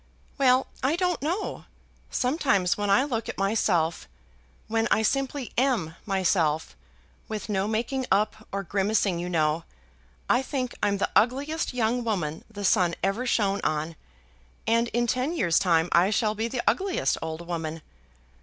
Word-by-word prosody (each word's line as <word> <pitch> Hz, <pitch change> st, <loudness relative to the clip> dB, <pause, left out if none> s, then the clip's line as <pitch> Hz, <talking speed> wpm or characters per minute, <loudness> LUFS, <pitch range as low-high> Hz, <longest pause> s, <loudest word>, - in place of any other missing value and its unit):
"Well, 260 Hz, -1 st, +4 dB, 0.2 s
I 270 Hz, +5 st, +2 dB
don't 360 Hz, -1 st, 0 dB
know. 345 Hz, +8 st, -3 dB, 0.4 s
Sometimes 250 Hz, -, +1 dB
when 205 Hz, -1 st, -2 dB
I 200 Hz, +7 st, +5 dB
look 235 Hz, -6 st, -3 dB
at -, -, -5 dB
myself, 195 Hz, -5 st, +1 dB, 0.6 s
when 225 Hz, 0 st, +1 dB
I 220 Hz, -, +3 dB
simply 275 Hz, +1 st, -1 dB
am 225 Hz, -, +1 dB
myself, 170 Hz, -, +1 dB, 0.5 s
with 215 Hz, 0 st, -5 dB
no 195 Hz, -1 st, 0 dB
making 245 Hz, +4 st, -1 dB
up 215 Hz, +2 st, +1 dB
or 200 Hz, 0 st, -2 dB
grimacing, 195 Hz, -1 st, +1 dB
you 175 Hz, +1 st, -3 dB
know, 160 Hz, -1 st, +1 dB, 0.6 s
I 245 Hz, -, +3 dB
think 260 Hz, -2 st, -3 dB
I'm 200 Hz, -1 st, +2 dB
the -, -, -1 dB
ugliest 275 Hz, +6 st, +1 dB
young 240 Hz, +1 st, +1 dB
woman 175 Hz, -9 st, -2 dB
the 205 Hz, -2 st, -6 dB
sun 180 Hz, -4 st, +3 dB
ever 205 Hz, +7 st, 0 dB
shone 200 Hz, -4 st, +1 dB
on. 155 Hz, +1 st, -1 dB, 0.7 s
And 230 Hz, +1 st, +2 dB
in 240 Hz, +1 st, 0 dB
ten 255 Hz, +6 st, 0 dB
years' 170 Hz, -, +3 dB
time 165 Hz, -2 st, +3 dB
I 175 Hz, +3 st, +4 dB
shall 215 Hz, 0 st, +1 dB
be 220 Hz, +2 st, -2 dB
the 240 Hz, +1 st, -3 dB
ugliest 390 Hz, -1 st, +1 dB
old 160 Hz, +1 st, -5 dB
woman. 165 Hz, -2 st, -4 dB
215 Hz, 155 wpm, -26 LUFS, 180-250 Hz, 0.7 s, I